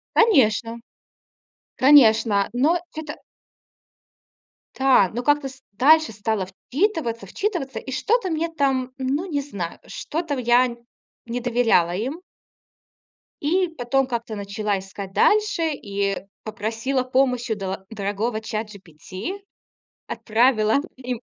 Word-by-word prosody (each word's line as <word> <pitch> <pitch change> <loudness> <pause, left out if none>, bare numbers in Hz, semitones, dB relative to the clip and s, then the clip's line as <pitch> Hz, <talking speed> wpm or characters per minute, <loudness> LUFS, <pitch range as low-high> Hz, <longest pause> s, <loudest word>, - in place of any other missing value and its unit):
Конечно! 235 - +3 1.0
Конечно! 225 -7 +5
Но 310 +8 +2 0.2
это 300 -1 -6 1.6
Да. 265 -8 +4
Но 245 +2 -3
как-то 290 -1 +2
ст 260 0 -16
дальше 310 +4 +5
стала 210 -2 -2
вчитываться, 245 - -2
вчитываться 275 - -3
и 265 - -8
что-то 415 - +1
мне 325 0 -1
там 270 -5 0
ну, 270 +6 -1
не 290 -3 -1
знаю 200 -12 -6
что-то 320 -2 -4
в - - -4
я 240 0 +3 0.5
не 240 +1 -3
доверяла 235 -8 +2
им. 265 - -4 1.2
И 360 +5 +2
потом 260 +2 +1
как-то 235 -3 -4
начала 200 0 -2
искать 195 0 -9
дальше 415 - +2
и 200 -4 -2 0.3
попросила 225 +5 -2
помощи 255 -2 +1
у - - +1
до 190 -1 -5
дорогого 215 +2 -2
ChatGPT. 210 - -6 0.7
Отправила 220 -1 +2 0.2
им 250 -2 -5
245 Hz, 110 wpm, -23 LUFS, 215-285 Hz, 1.6 s, Конечно